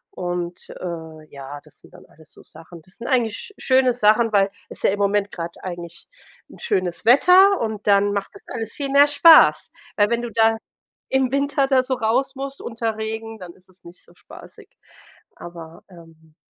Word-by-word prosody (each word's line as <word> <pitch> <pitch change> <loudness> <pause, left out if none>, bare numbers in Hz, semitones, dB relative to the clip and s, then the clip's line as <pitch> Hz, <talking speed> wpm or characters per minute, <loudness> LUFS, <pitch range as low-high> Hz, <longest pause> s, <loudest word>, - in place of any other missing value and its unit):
Und, 175 -1 -5
äh, 160 -3 -8
ja, 140 +1 -10
das 150 - -22
sind - - -20
dann - - -16
alles 160 0 -21
so - - -17
Sachen 165 +1 -15
das 185 - -22
sind 235 - -8
eigentlich 235 -5 -1
sch 410 - -18
schöne 260 -1 +3
Sachen, 220 0 +2
weil 195 -1 +2 0.2
ist - - -11
ja - - +3
im 205 - -4
Moment 200 0 0
grad 170 -1 -7
eigentlich 175 -2 -8 0.4
'n - - -16
schönes 185 - -2
Wetter 365 - +5
und 215 -2 -5
dann 200 0 +3
macht 200 -1 -3
das - - -15
alles 225 -2 -6
viel 280 -2 -5
mehr 285 +1 +6
Spaß. 290 - +5 0.2
Weil, 205 0 +2
wenn 235 0 0
du 240 - -5
da 225 +1 +2 0.5
im 265 -1 0
Winter 280 0 0
da 265 -2 +3
so 260 0 -2
raus 250 +4 -1
musst 275 +1 -7
unter 225 -1 -4
Regen, 220 0 -6
dann 175 -2 -10
ist 185 +1 -24
es 185 0 -22
nicht 175 +1 -15
so - - -22
spaßig. - - -15 0.7
Aber, 170 -1 -12
ähm 165 -3 -18
210 Hz, 195 wpm, -21 LUFS, 175-255 Hz, 0.7 s, mehr